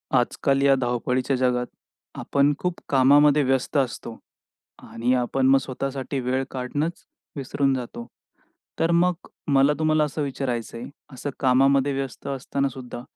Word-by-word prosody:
आजकाल 135 Hz, +2 st, +1 dB
या 140 Hz, -1 st, +5 dB
धावपळीच्या 125 Hz, +2 st, 0 dB
जगात, 125 Hz, -1 st, +1 dB, 0.5 s
आपण 140 Hz, +1 st, +2 dB
खूप 180 Hz, -1 st, -2 dB
कामामध्ये 145 Hz, +2 st, +5 dB
व्यस्त 135 Hz, +2 st, 0 dB
असतो 120 Hz, -3 st, -2 dB, 0.7 s
आणि 120 Hz, +2 st, 0 dB
आपण 130 Hz, +2 st, +1 dB
मग 135 Hz, 0 st, +6 dB
स्वतःसाठी 135 Hz, +1 st, -4 dB
वेळ 130 Hz, +1 st, -1 dB
काढणंच 145 Hz, +6 st, -3 dB, 0.3 s
विसरून 140 Hz, 0 st, 0 dB
जातो. 120 Hz, -2 st, -5 dB, 0.7 s
तर 165 Hz, +1 st, +2 dB
मग 175 Hz, +1 st, +1 dB, 0.2 s
मला 140 Hz, +1 st, +4 dB
तुम्हाला 155 Hz, -1 st, +2 dB
असं 150 Hz, +1 st, -3 dB
विचारायचंय, 125 Hz, -4 st, -3 dB, 0.3 s
असं 130 Hz, +2 st, -5 dB
कामामध्ये 135 Hz, +1 st, +3 dB
व्यस्त 135 Hz, -1 st, -5 dB
असताना 140 Hz, 0 st, -2 dB
सुद्धा 125 Hz, -2 st, -8 dB
135 Hz, 130 wpm, -24 LUFS, 125-140 Hz, 0.7 s, मग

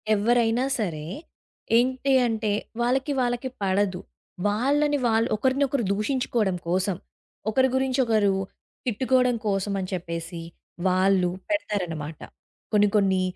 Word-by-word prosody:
ఎవ్వరైనా 235 Hz, +3 st, +2 dB
సరే. 155 Hz, -7 st, -2 dB, 0.7 s
ఏంటి 260 Hz, +2 st, +1 dB, 0.2 s
అంటే 220 Hz, -2 st, -1 dB, 0.3 s
వాళ్ళకి 265 Hz, +4 st, +1 dB
వాళ్ళకి 245 Hz, +1 st, -1 dB
పడదు. 190 Hz, -1 st, +1 dB, 0.5 s
వాళ్ళని 285 Hz, +8 st, +2 dB
వాళ్ళు 225 Hz, +2 st, +2 dB
ఒకరినొకరు 265 Hz, +2 st, +1 dB
దూషించుకోవడం 215 Hz, -4 st, 0 dB
కోసం, 185 Hz, +1 st, +1 dB, 0.5 s
ఒకరి 260 Hz, +3 st, +3 dB
గురించి 265 Hz, 0 st, +1 dB
ఒకరు 215 Hz, -3 st, +3 dB, 0.5 s
తిట్టుకోవడం 250 Hz, +1 st, +2 dB
కోసమని 195 Hz, -1 st, -1 dB
చెప్పేసి, 170 Hz, -1 st, -5 dB, 0.5 s
వాళ్ళు 185 Hz, -1 st, +3 dB, 0.2 s
పెడతారనమాట. 175 Hz, -, -2 dB, 0.5 s
కొన్ని 205 Hz, 0 st, +5 dB
కొన్ని 190 Hz, -2 st, +3 dB
215 Hz, 100 wpm, -25 LUFS, 190-255 Hz, 0.7 s, కొన్ని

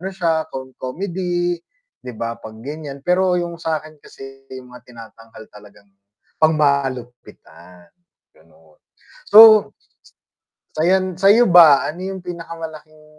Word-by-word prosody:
sya 165 Hz, -3 st, -1 dB
kung 130 Hz, -2 st, -9 dB
com 130 Hz, 0 st, -7 dB
comedy 175 Hz, -2 st, -3 dB, 0.4 s
'di 125 Hz, -3 st, -10 dB
ba 115 Hz, +1 st, -6 dB
'pag 110 Hz, 0 st, -12 dB
ganyan, 145 Hz, -1 st, -9 dB
pero 180 Hz, 0 st, +1 dB
yung 170 Hz, -1 st, -4 dB
sakin 155 Hz, -1 st, -5 dB
kasi 135 Hz, 0 st, -15 dB
yung 130 Hz, -1 st, -12 dB
mga 125 Hz, 0 st, -16 dB
tinatanghal 115 Hz, -1 st, -15 dB
talagang 100 Hz, -1 st, -19 dB, 0.5 s
pang 155 Hz, 0 st, +3 dB
malupitan, 120 Hz, -, -5 dB, 0.4 s
ganon. 80 Hz, -1 st, -26 dB, 0.5 s
So, 215 Hz, 0 st, +7 dB, 1.1 s
sayan 185 Hz, +2 st, 0 dB
sa'yo 205 Hz, +3 st, +4 dB
ba 165 Hz, -5 st, +6 dB
ano 170 Hz, +4 st, -8 dB
yung 190 Hz, -, -8 dB
pinakamalaking 160 Hz, -3 st, -10 dB
155 Hz, 120 wpm, -18 LUFS, 125-175 Hz, 1.1 s, So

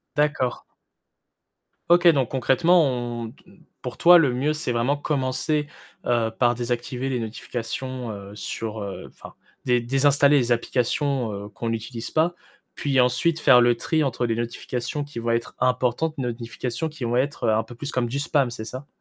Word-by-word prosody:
D'accord. 145 Hz, -4 st, 0 dB, 1.3 s
OK 175 Hz, +1 st, +5 dB
donc 135 Hz, -7 st, +3 dB
concrètement 165 Hz, +7 st, +3 dB
on 120 Hz, -3 st, -3 dB
te -, -, -23 dB, 0.4 s
pour 125 Hz, -1 st, -6 dB
toi 175 Hz, +1 st, +8 dB
le 145 Hz, -6 st, +3 dB
mieux 135 Hz, +5 st, 0 dB
c'est 155 Hz, -4 st, -3 dB
vraiment 120 Hz, +4 st, +1 dB
commencer, 145 Hz, +1 st, -1 dB, 0.4 s
heu, 115 Hz, -2 st, +1 dB
par 120 Hz, -1 st, +3 dB
désactiver 120 Hz, +2 st, -3 dB
les 130 Hz, -2 st, -1 dB
notifications 120 Hz, +2 st, -5 dB
heu, 100 Hz, 0 st, -9 dB
sur, 110 Hz, 0 st, -4 dB
heu, 100 Hz, -1 st, -6 dB
enfin -, -, -14 dB, 0.3 s
dé 125 Hz, -1 st, +2 dB
désinstaller 140 Hz, +3 st, +4 dB
les 120 Hz, -2 st, +1 dB
applications, 125 Hz, +1 st, 0 dB
heu, 100 Hz, 0 st, -6 dB
qu'on 115 Hz, +1 st, -4 dB
utilise 115 Hz, +1 st, -5 dB
pas 165 Hz, +3 st, +2 dB, 0.4 s
puis 135 Hz, -3 st, +1 dB
ensuite 125 Hz, +7 st, +2 dB
faire 125 Hz, -3 st, +7 dB
le 120 Hz, 0 st, +4 dB
tri 155 Hz, +5 st, 0 dB
entre 130 Hz, -3 st, -1 dB
les 115 Hz, -1 st, -1 dB
notifications 120 Hz, +4 st, -3 dB
qui 145 Hz, -4 st, -9 dB
vont 115 Hz, 0 st, -2 dB
être 115 Hz, 0 st, -2 dB
importantes, 125 Hz, +5 st, 0 dB
notifications 120 Hz, +3 st, -3 dB
qui 150 Hz, -4 st, -7 dB
vont 120 Hz, +1 st, 0 dB
être, 140 Hz, +3 st, -1 dB
heu, 110 Hz, -, +3 dB
un 110 Hz, 0 st, +1 dB
peu 120 Hz, -, -12 dB
plus 140 Hz, +4 st, -3 dB
comme 125 Hz, -3 st, 0 dB
du 135 Hz, +4 st, -3 dB
spam 140 Hz, -3 st, +1 dB
c'est 115 Hz, -2 st, -6 dB
ça? 130 Hz, +5 st, -7 dB
125 Hz, 175 wpm, -24 LUFS, 120-145 Hz, 1.3 s, toi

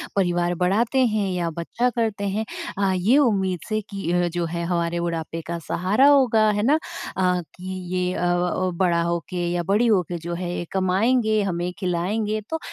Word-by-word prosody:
परिवार 175 Hz, -2 st, +1 dB
बढ़ाते 225 Hz, +9 st, +2 dB
हैं 210 Hz, -3 st, 0 dB
या 175 Hz, -2 st, -1 dB
बच्चा 235 Hz, +9 st, 0 dB
करते 220 Hz, -4 st, -1 dB
हैं 215 Hz, +3 st, -2 dB, 0.3 s
अ, 195 Hz, -1 st, +2 dB
ये 205 Hz, +10 st, +3 dB
उम्मीद 195 Hz, -9 st, +2 dB
से 215 Hz, 0 st, 0 dB
कि 195 Hz, -4 st, -3 dB
अ, 175 Hz, 0 st, +2 dB
जो 175 Hz, 0 st, -2 dB
है 170 Hz, +1 st, -3 dB
हमारे 170 Hz, -1 st, -1 dB
बुढ़ापे 165 Hz, -1 st, -3 dB
का 170 Hz, 0 st, -3 dB
सहारा 205 Hz, +10 st, +3 dB
होगा, 240 Hz, -7 st, +5 dB
है 210 Hz, 0 st, -1 dB
ना? 280 Hz, +6 st, +4 dB, 0.4 s
अ, 180 Hz, -1 st, +2 dB, 0.2 s
कि 185 Hz, +1 st, -6 dB, 0.2 s
ये 180 Hz, 0 st, 0 dB
अ, 175 Hz, -, -1 dB, 0.6 s
बड़ा 170 Hz, -2 st, +3 dB
हो 170 Hz, 0 st, 0 dB
के 175 Hz, -1 st, -2 dB
या 175 Hz, 0 st, -1 dB
बड़ी 210 Hz, +7 st, +2 dB
हो 205 Hz, -5 st, +4 dB
के 175 Hz, -, -3 dB
जो 170 Hz, +1 st, -5 dB
है 175 Hz, 0 st, -4 dB
ये 175 Hz, -, -3 dB
कमाएँगे, 215 Hz, +4 st, +2 dB
हमें 175 Hz, -2 st, -2 dB
खिलाएँगे, 205 Hz, +4 st, -1 dB
तो 320 Hz, -, -2 dB
185 Hz, 190 wpm, -23 LUFS, 175-215 Hz, 0.6 s, होगा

